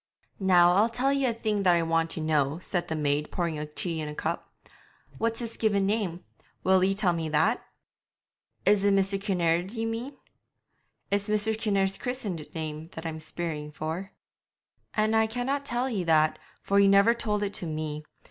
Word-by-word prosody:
'Now 180 -2 +5
I'll 210 +5 +4
tell 255 +4 +1
ye 275 -1 +1
a - - +2
thing 215 -3 -1
that 180 -3 +4
I 170 - +2
want 165 0 +1
to 165 - -3
know,' 150 -2 +1
said 180 0 -3
the 160 - -2
maid, 150 0 0
pouring 165 -4 -2
tea 165 -3 -1
in 150 - -4
a 150 - -7
cup. 165 +2 -3 0.7
'What's 225 0 0
his 230 -1 -5
given 205 -3 +2
name? 195 -4 -1 0.4
Will 190 0 +4
ye 195 +1 +2
tell 190 -3 +2
me 165 -2 -2
that?' 205 +10 +2 1.0
'Is 205 -1 +4
it 200 -1 +4
Mr. 195 0 +1
Kinnaird 180 -1 +1
ye 225 0 -2
mean?' 235 +5 -4 0.9
'It's 200 +1 0
Mr. 215 +1 +2
Kinnaird's 195 -3 0
christened 210 - -3
name 155 -1 -4
that 160 - -7
I'm 160 -1 -4
speering 155 -1 -4
for.' 160 +6 -4 0.9
'An' 215 0 +2
I 220 0 +4
canna 245 +5 -1
tell 255 -2 -1
ye 210 -8 -1
that, 155 -1 +3 0.2
for 200 0 +3
he 200 - +6
never 200 +4 +6
told 210 -3 -1
it 200 0 -2
to 175 - -2
me. 155 -1 -4
195 Hz, 185 wpm, -27 LUFS, 160-215 Hz, 1.0 s, he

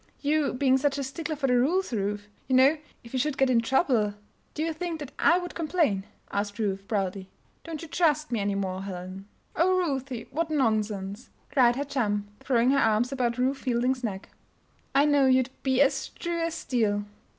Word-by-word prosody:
"You 295 0 +1
being 265 0 +3
such 285 0 +1
a 280 - -2
stickler 310 +4 -4
for 280 -1 -2
the 250 -2 +3
rules, 325 +5 +1
Ruth. 205 -1 -2 0.2
You 260 - +2
know, 270 +5 +6 0.3
if 235 - -13
we 260 - 0
should 285 +1 0
get 270 -1 +3
into 230 -2 +2
trouble 245 - +2 0.2
" - - -40
"Do 310 - -1
you 325 0 -1
think 335 0 -4
that 290 -2 -7
I 340 - +5
would 355 -1 -5
complain?" 310 - 0 0.3
asked 205 +1 -2
Ruth, 195 -3 -2
proudly. 195 -3 -2 0.3
"Don't 330 -2 -6
you - - -7
trust 305 -3 +1
me 235 - 0
any 200 0 0
more, 190 -1 -2
Helen?" 190 0 -7 0.3
"Oh, 370 +3 +3
Ruthie! 270 -8 -2
what 320 +3 -1
nonsense!" 215 -6 -1 0.2
cried 245 -4 +4
her 280 - -1
chum, 210 -7 -1
throwing 250 -1 +2
her 275 - +3
arms 225 +1 +2
about 245 -3 -1
Ruth 265 +2 0
Fielding's 250 +1 0
neck. 195 -4 -4 0.7
"I 280 +1 +5
know 285 -2 +4
you'd 260 0 +3
be 265 0 +2
as 270 -1 0
true 340 -1 -4
as 330 0 -1
steel." 210 -8 0
260 Hz, 195 wpm, -27 LUFS, 210-295 Hz, 0.7 s, know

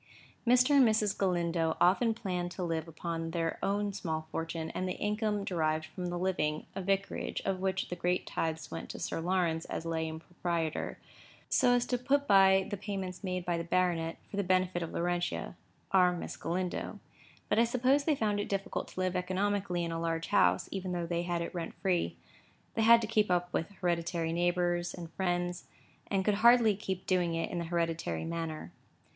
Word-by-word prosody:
Mr. 250 +3 +5
and 275 - +8
Mrs. 215 -3 +3
Galindo 170 -3 +1
often 220 +6 +4
planned 180 -6 -2
to 180 +1 -5
live 165 -1 -2
upon 165 0 -4
their 165 -1 -2
own 205 0 0
small 160 -5 -3
fortune 165 0 -3
and 185 - -2
the 180 - -3
income 210 -1 0
derived 160 -4 0
from 180 +3 -6
the 175 0 -2
living 175 -4 0
(a - - -2
vicarage, 195 +1 -1
of 190 -1 0
which 190 0 -1
the 180 - -3
great 180 +1 0
tithes 160 -1 -3
went 85 0 -6
to - - -6
Sir - - -3
Lawrence 170 -2 0
as - - -5
lay 160 -1 -1
impropriator), 165 0 -3 0.5
so 245 - +4
as 245 - +2
to 245 - -1
put 280 +3 +1
by 190 -1 +6
the 205 - -2
payments 190 -2 -5
made 180 -2 -2
by 175 -1 0
the - - -2
baronet, 170 -2 0
for 200 - -5
the 200 - +2
benefit 185 -1 +1
of 165 - -4
Laurentia—our 175 +1 0
Miss 175 - -5
Galindo. 180 +2 -3 0.5
But 210 - +2
I - - +7
suppose 255 +4 +2
they 310 - +3
found 210 -5 0
it 205 - -3
difficult 195 -1 -2
to - - -9
live 185 0 0
economically 185 0 0
in 170 - -2
a 165 0 -3
large 165 0 -2
house, 205 - +3
even 190 -2 -3
though 175 -1 -1
they 170 0 -1
had 175 -1 -1
it 170 - -6
rent 170 -2 -4
free. 180 -3 0 0.6
They 225 - 0
had 230 +1 +7
to 220 - -2
keep 215 -2 +2
up 180 0 +1
with 165 - -1
hereditary 170 -3 -1
neighbours 175 0 +1
and 170 -2 -9
friends, 175 -1 -1 0.4
and 190 -2 0
could 210 - +3
hardly 235 -2 +7
help 190 -2 -4
doing 175 -3 +1
it 165 - -2
in 175 - -2
the 170 - -3
hereditary 165 - -1
manner. 165 - -4
180 Hz, 190 wpm, -31 LUFS, 170-195 Hz, 0.6 s, and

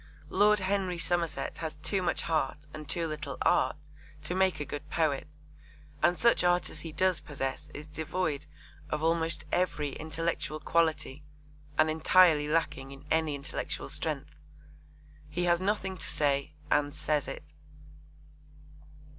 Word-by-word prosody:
Lord 210 +1 +5
Henry 190 -2 0
Somerset 170 -1 -1
has 160 -2 -4
too 195 -2 -1
much 175 - 0
heart 150 -2 -1
and 155 -1 -8
too 170 -1 0
little 150 -3 -4
art 150 +3 +2 0.3
to 160 - -2
make 185 -3 +2
a 150 - -2
good 145 +1 -6
poet, 155 -4 +1 0.7
and 175 0 +4
such 235 -5 +4
art 175 0 +3
as 155 - -7
he 165 +1 -7
does 185 +1 +2
possess 135 -3 -4
is 150 +1 -7
devoid 155 -1 -2 0.4
of 150 - -2
almost 165 0 +1
every 165 -5 +1
intellectual 160 -1 -2
quality 155 -3 +1 0.5
and 155 - +5
entirely 160 -1 +5
lacking 150 -4 0
in 140 +1 -11
any 160 -2 +2
intellectual 140 0 -4
strength. - - -2 1.0
He 170 +4 -1
has 175 0 +3
nothing 190 -1 0
to - - -3
say 140 0 +1 0.2
and 145 0 +2
says 150 -1 0
it. - - -6
160 Hz, 140 wpm, -30 LUFS, 150-175 Hz, 1.0 s, Lord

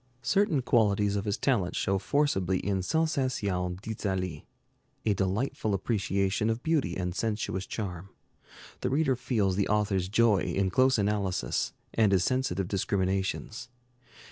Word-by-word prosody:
Certain 160 - +2
qualities 105 -4 +2
of 100 +1 -2
his 100 -1 -1
talent 100 -10 0
show 95 0 0
forcibly 95 -6 +1
in 95 0 -1
'Sensations 105 - -1
d'Italie,' 95 -7 -3 0.6
a 105 - +3
delightful 100 +2 -1
appreciation 100 0 0
of 115 +2 -2
beauty 160 -3 +1
and 90 -1 -2
sensuous 105 -2 -2
charm. 95 -3 -5 0.7
The - - -1
reader 135 0 +2
feels 110 -6 0
the 100 - +1
author's 100 -3 +1
joy 110 -1 +4
in 95 +1 0
close 130 +4 +4
analysis, 100 -2 -1 0.2
and 110 -3 +3
his 90 -2 +3
sensitive 100 -8 0
discriminations. 100 +4 -1
100 Hz, 130 wpm, -29 LUFS, 95-120 Hz, 0.7 s, joy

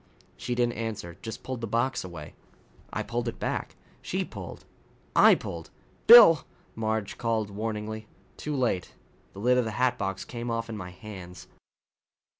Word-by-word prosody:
She 125 - -3
didn't 120 -1 +1
answer. 105 -7 -5
Just 110 - -7
pulled 130 -2 -5
the 115 - -3
box 120 +5 0
away. 85 -5 -8 0.6
I - - -2
pulled 120 0 -3
it 115 - -3
back. - - -3 0.3
She - - -2
pulled. - - -9 0.5
I - - +8
pulled. 85 -1 -7 0.4
"Bill 220 - +10 0.2
" - - -33
Marge 110 -2 -2
called 110 -3 0
warningly. 110 +1 -4 0.3
Too 150 -1 -4
late. 120 -9 -1 0.4
The 95 - -10
lid 125 +4 +4
of 125 - +1
the 110 0 -4
hatbox 120 -6 0
came 120 0 -5
off 115 0 -2
in - - -4
my 90 -4 -6
hands. 90 -1 -10
110 Hz, 160 wpm, -28 LUFS, 100-120 Hz, 0.6 s, Bill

